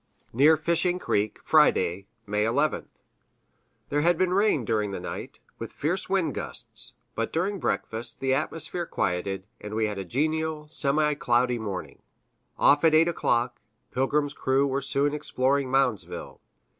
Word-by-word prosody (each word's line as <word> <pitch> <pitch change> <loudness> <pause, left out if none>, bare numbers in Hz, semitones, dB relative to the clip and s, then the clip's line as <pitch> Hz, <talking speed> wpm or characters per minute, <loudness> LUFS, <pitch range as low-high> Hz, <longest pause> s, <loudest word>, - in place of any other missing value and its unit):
Near 150 +6 +5
Fishing 170 +3 +1
Creek, 105 - -1
Friday, 100 - +3 0.2
May 105 0 0
11th. 140 +7 0 1.0
There 145 +1 +1
had 175 +2 +3
been 185 0 +1
rain 195 - +2
during 105 -2 0
the 100 - -4
night, 90 - -7 0.2
with - - -6
fierce - - -2
wind - - +1
gusts, - - -5 0.2
but - - -2
during 190 +4 -1
breakfast 115 -6 -2
the 135 0 +1
atmosphere 165 +4 -2
quieted, 95 +2 -2
and 105 +1 -7
we 110 0 +1
had 105 -2 -3
a - - -3
genial, 155 - -1
semi 150 0 +1
cloudy 125 -3 +1
morning. 100 -4 -6 0.6
Off 145 +2 +4
at 160 -1 +5
8 165 +2 +5
o'clock, 120 -6 0 0.3
Pilgrim's 145 +3 0
crew 135 0 +1
were 140 0 -1
soon 140 +1 +1
exploring 140 -2 0
Moundsville. 130 -5 -1
140 Hz, 145 wpm, -26 LUFS, 115-155 Hz, 1.0 s, Near